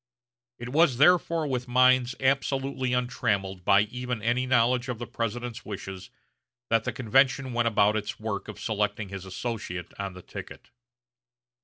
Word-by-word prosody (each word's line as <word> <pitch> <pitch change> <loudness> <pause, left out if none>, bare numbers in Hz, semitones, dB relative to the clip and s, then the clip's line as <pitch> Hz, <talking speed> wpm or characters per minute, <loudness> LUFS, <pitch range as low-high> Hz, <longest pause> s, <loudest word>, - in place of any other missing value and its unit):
It 120 +1 -7
was 145 -2 +3
therefore 165 +1 +4
with 125 -3 -2
minds 125 0 +4
absolutely 135 -1 0
untrammeled 100 -7 -1
by 100 +3 +5
even 125 +2 -3
any 125 +3 +1
knowledge 125 +1 +2
of 125 - -3
the 120 - -5
President's 120 +1 -4
wishes 95 -2 -7 0.6
that 115 -1 +3
the - - 0
convention 130 +1 +2
went 120 0 +1
about 105 -1 +3
its 105 -1 -3
work 110 -2 -4
of 110 - -8
selecting 105 -1 -2
his 95 -1 -7
associate 95 -3 -5
on 100 -1 -3
the 90 -1 -11
ticket. - - -10
120 Hz, 150 wpm, -27 LUFS, 105-130 Hz, 0.6 s, by